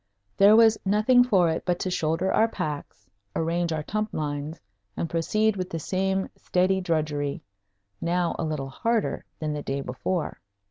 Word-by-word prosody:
There 200 +2 +7
was 225 -1 +6
nothing 215 +5 +4
for 195 -8 +3
it 160 - -3
but 180 -1 0
to 185 - -1
shoulder 165 +3 0
our 225 - +4
packs, 145 - -5 0.3
arrange 170 +1 0
our 155 -1 -2
tump 215 +5 -2
lines, 150 +1 -3 0.4
and 170 - -1
proceed 215 +7 +1
with 185 -1 -4
the 165 - -3
same 190 +4 -1
steady 185 +1 +1
drudgery 150 -5 -1 0.6
now 175 0 0
a - - 0
little 150 -4 -3
harder 230 +10 -1
than 155 -1 -3
the 150 - -3
day 140 0 -3
before. 155 +7 -3
175 Hz, 165 wpm, -26 LUFS, 155-195 Hz, 0.6 s, There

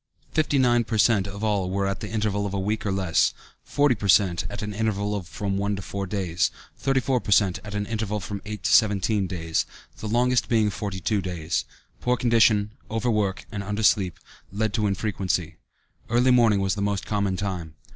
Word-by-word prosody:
Fifty 155 -2 +1
nine 120 -2 +4
per 110 0 -2
cent. 105 -3 +3
of 100 +2 -7
all 100 -4 +1
were 100 +1 0
at 100 +2 -3
an 105 - -4
interval 105 -2 -1
of 100 - -4
a - - 0
week 105 +2 -2
or - - 0
less; 95 -4 +2 0.3
forty 145 -2 +2
per 100 -3 -4
cent. 90 -1 +4
at 105 +1 -6
an 105 0 -4
interval 105 -1 -1
of 95 -5 -5
from 100 +1 -3
one 100 +1 0
to 95 - -6
four 100 0 -4
days; 90 -3 0 0.3
thirty 135 -1 +1
four 130 -1 +1
per 105 - -9
cent, 100 -1 +3
at 105 0 -7
an 105 0 -1
interval 110 -1 -2
of 100 - -6
from 100 +2 -5
eight 105 -2 -7
to - - +2
seventeen 105 -2 +3
days, 80 -3 -1 0.4
the 110 - -5
longest 125 +3 +2
being 110 -3 +3
forty 95 -1 -4
two 100 +3 0
days. 85 -3 -2 0.3
Poor 125 0 +1
condition, 110 -4 +3 0.2
overwork, 105 -3 0
and 105 -2 -4
undersleep, 105 -2 +2 0.4
led 105 +1 -1
to 110 -3 +1
infrequency. 95 -4 -2 0.5
Early 125 +2 +4
morning 115 -5 +4
was 95 -1 +1
the 100 - -3
most 100 -1 -1
common 100 -3 -1
time. 90 -6 -4
105 Hz, 205 wpm, -25 LUFS, 95-110 Hz, 0.5 s, nine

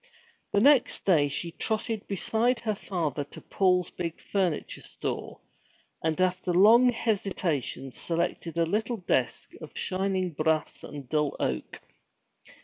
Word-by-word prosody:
The 200 - +3
next 270 +2 +4
day 160 -7 +4
she 155 +4 -3
trotted 220 +3 -2
beside 230 +5 0
her 215 -2 0
father 165 -8 -2
to - - -11
Paul's 180 -2 +1
big 170 -2 -5
furniture 185 -6 -2
store, - - -5 0.6
and 160 +1 0
after 185 0 +1
long 230 +7 +7
hesitation 185 - -2
selected 170 +2 -2
a 165 - +3
little 220 +7 -1
desk 180 - -1
of - - -10
shining 190 -1 -1
brass 155 0 -1
and 145 -3 -8
dull 150 +1 0
oak. 65 -1 -3
180 Hz, 130 wpm, -28 LUFS, 160-210 Hz, 0.6 s, long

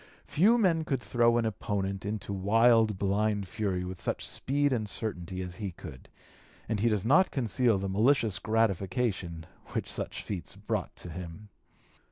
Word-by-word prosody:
Few 210 +10 +4
men 175 -8 +2
could 135 -4 -1
throw 120 +2 +2
an 115 - +1
opponent 100 -2 -2
into 105 -1 -4
wild 110 +2 +4
blind 100 +1 0
fury 100 -4 -2
with 90 0 -6
such - - -1
speed 145 +1 +1
and 110 -4 -1
certainty 95 -4 -3
as 90 0 -8
he 100 -3 -4
could; 75 -6 -11 0.6
and 110 - -1
he 115 +3 +3
does 105 -2 0
not 175 +10 +5
conceal 115 -3 +1
the 95 +1 -3
malicious 110 +2 +2
gratification 100 -5 0 0.3
which - - -2
such - - -4
feats 95 -4 -6
brought - - -3
to 90 - -7
him. 90 +5 -8
105 Hz, 160 wpm, -29 LUFS, 95-120 Hz, 0.6 s, not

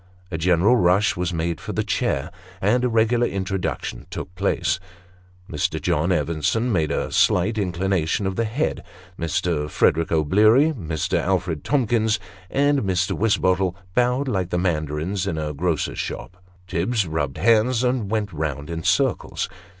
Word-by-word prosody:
A 80 - -2
general 90 +8 +4
rush 95 +1 +3
was 90 0 -1
made 85 0 -2
for - - -5
a - - +2
chair, 70 +6 -1 0.3
and 115 +7 +2
a 125 - +2
regular 115 +1 +2
introduction 95 -10 -3
took 90 - -6
place. 90 - 0 0.7
Mr. 75 -6 -1
John 80 +5 0
Evenson 85 - 0
made 80 -7 +1
a - - -2
slight 95 +5 +3
inclination 95 -1 0
of 95 0 -1
the 115 - 0
head; 125 +8 -2 0.4
Mr. 80 -2 -1
Frederick 80 +2 +2
O'Bleary, 105 - +4
Mr. 80 - -2
Alfred 90 -5 -1
Tomkins, 115 -6 +1 0.3
and 145 +1 +2
Mr. 95 -4 0
Wisbottle, 95 -4 +1 0.2
bowed 125 +4 +1
like 95 -8 -1
the 90 - -1
mandarins 85 +2 -1
in 85 -5 -2
a 75 -1 -3
grocer's 80 +1 -1
shop; 90 - -5 0.3
Tibbs 95 +5 0
rubbed 75 -4 -2
hands, 115 +6 +3
and 125 -5 0
went 105 -3 -1
round 75 0 -3
in 80 -1 -3
circles. - - 0
95 Hz, 150 wpm, -23 LUFS, 80-110 Hz, 0.7 s, general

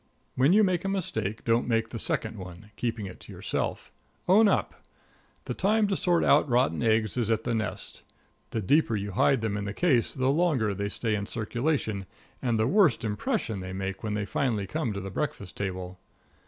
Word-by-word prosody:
When 135 +5 +3
you 215 +3 +6
make 185 -3 +1
a 195 - -1
mistake, 110 - -2
don't 115 +1 +2
make 115 -1 +1
the 115 - -6
second 110 -1 -2
one 90 +3 -10
keeping 115 -2 -2
it 95 - -9
to - - -12
yourself. - - -3 0.4
Own 210 +4 +6
up. - - 0 0.6
The - - -3
time 215 +2 +2
to 195 - +1
sort 175 -2 +2
out 145 0 +4
rotten 120 -10 +2
eggs 110 -1 +2
is 115 -3 0
at 110 0 +1
the 120 - -1
nest. 110 -2 -3 0.5
The 110 - -3
deeper 140 - +3
you 100 0 -3
hide 130 +6 +3
them 110 -2 -1
in 100 - -3
the 105 0 -4
case 135 -10 +2
the 130 0 +2
longer 140 - +2
they 100 +1 -3
stay 110 +1 -1
in 100 -1 -2
circulation, 115 -3 -2 0.3
and 120 -3 +1
the 110 - +2
worse 175 - +4
impression 110 - -1
they 95 0 -6
make 95 0 -4
when 105 -2 -2
they 105 -1 -1
finally 110 -3 -1
come 100 +4 -2
to 100 - -4
the 95 +1 -6
breakfast 100 -6 -4
table. 95 -2 -4
115 Hz, 200 wpm, -28 LUFS, 100-140 Hz, 0.6 s, you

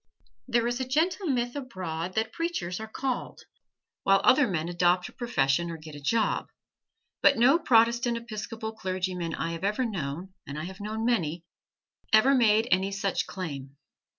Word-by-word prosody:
There 235 0 +2
is 240 +1 -1
a 260 - -2
gentle 340 +8 +1
myth 245 -3 0
abroad 185 - -5
that 220 0 0
preachers 330 - -2
are 220 - -6
"called," 255 +3 -4 0.6
while 195 0 +4
other 260 +2 +5
men 165 -5 -2
adopt 175 +1 +2
a - - -17
profession 170 - 0
or 165 - -5
get 155 -1 -11
a 145 - -9
job, 220 +10 +1 0.7
but - - +5
no 265 +8 +5
Protestant 235 -3 +3
Episcopal 220 -1 -6
clergyman 185 -5 -3
I 165 - -2
have 165 +2 -6
ever 210 +6 +1
known, 180 -3 -4
and 140 +1 -6
I 155 - -4
have 190 +3 -8
known 215 +2 -3
many, 170 -9 0 0.7
ever 215 +6 +6
made 225 -3 +4
any 190 +2 +2
such 195 -1 -1
claim. 140 -7 -6
210 Hz, 165 wpm, -28 LUFS, 175-240 Hz, 0.7 s, ever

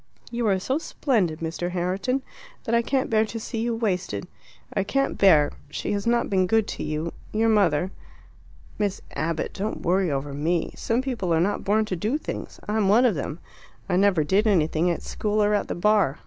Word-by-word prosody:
"You 235 -1 -1
are 195 -2 +3
so 260 +10 -1
splendid, 205 - 0
Mr. 165 +2 -3
Herriton, 190 +9 -1 0.4
that 230 - -2
I 235 - +5
can't 260 +2 0
bear 220 -1 +3
to 225 +1 -6
see 225 +1 -5
you 230 0 0
wasted. 180 - -2 0.5
I 195 - +1
can't 275 +7 0
bear 155 -7 +5 0.2
she - - -3
has 200 +1 -1
not 235 0 +2
been 185 -2 +2
good 220 +2 +2
to - - -4
you 155 +2 -3 0.2
your 225 +1 +2
mother." 185 -5 +3 0.9
"Miss 205 -2 -1
Abbott, 160 +2 -2
don't 210 +3 -4
worry 185 +1 +2
over 140 0 -2
me. 160 +4 -1
Some 235 +3 0
people 240 -10 -2
are 180 +6 +2
born 205 +2 +1
not - - 0
to 185 - -1
do 215 - 0
things. - - -6
I'm 210 -2 +1
one 230 +5 +5
of 235 - +4
them; 155 +1 -4 0.5
I 185 - 0
never 185 -4 +4
did 195 +8 +2
anything 165 -3 +2
at 170 - -2
school 210 0 0
or 205 0 +2
at 205 - +1
the - - -3
Bar. 200 -6 +2
200 Hz, 200 wpm, -25 LUFS, 170-225 Hz, 0.9 s, I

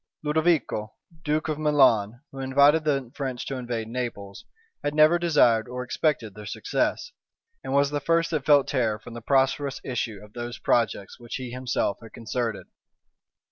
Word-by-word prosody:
Ludovico, 150 -8 0 0.3
duke 155 0 0
of 155 -1 -2
Milan, 125 -7 +3
who 135 - -9
invited 140 +4 +4
the 135 -5 0
French 130 -3 -4
to 135 - -4
invade 120 -3 -4
Naples, 115 -5 -5 0.4
had 145 0 -2
never 155 +3 +5
desired 145 -10 +3
or 125 0 -5
expected 125 -5 -1
their 105 0 -10
success; 135 - -2 0.5
and - - -5
was 140 +1 +3
the 145 - -1
first 165 +3 +1
that 155 -5 -1
felt 145 -1 +5
terror 115 -6 0
from 110 +2 -12
the 120 - -7
prosperous 135 +2 +1
issue 115 -4 -3
of 105 0 -16
those 120 0 -6
projects 115 -3 0
which 120 -1 -7
he 125 -2 -5
himself 125 -5 -1
had 115 - -13
concerted. 115 -1 -3
130 Hz, 165 wpm, -25 LUFS, 115-150 Hz, 0.5 s, never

